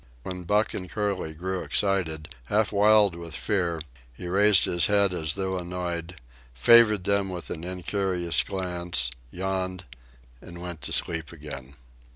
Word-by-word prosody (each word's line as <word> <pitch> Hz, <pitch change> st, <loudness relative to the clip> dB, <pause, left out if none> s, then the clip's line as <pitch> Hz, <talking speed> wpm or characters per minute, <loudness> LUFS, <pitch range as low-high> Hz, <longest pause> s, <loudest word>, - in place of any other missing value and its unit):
When 90 Hz, -1 st, -6 dB
Buck 105 Hz, +4 st, +2 dB
and 90 Hz, -2 st, -5 dB
Curly 95 Hz, -5 st, -2 dB
grew 95 Hz, +3 st, -3 dB
excited, 80 Hz, -6 st, 0 dB, 0.2 s
half 105 Hz, 0 st, +1 dB
wild 105 Hz, -1 st, +5 dB
with 85 Hz, -1 st, -8 dB
fear, 90 Hz, -5 st, -1 dB, 0.3 s
he 75 Hz, +9 st, -8 dB
raised 100 Hz, +1 st, +5 dB
his 85 Hz, -2 st, +3 dB
head 100 Hz, -2 st, +3 dB
as 80 Hz, -3 st, 0 dB
though 95 Hz, -1 st, -2 dB
annoyed, 90 Hz, -1 st, -4 dB, 0.4 s
favored 105 Hz, -, +6 dB
them 100 Hz, 0 st, +1 dB
with 90 Hz, -2 st, -6 dB
an 80 Hz, -, -5 dB
incurious 90 Hz, -1 st, 0 dB
glance, 90 Hz, -9 st, -2 dB, 0.2 s
yawned, 95 Hz, +2 st, -3 dB, 0.6 s
and 85 Hz, 0 st, -10 dB
went 85 Hz, -3 st, -7 dB
to -, -, -8 dB
sleep 80 Hz, -2 st, -1 dB
again. 70 Hz, -4 st, -9 dB
90 Hz, 145 wpm, -26 LUFS, 85-100 Hz, 0.6 s, favored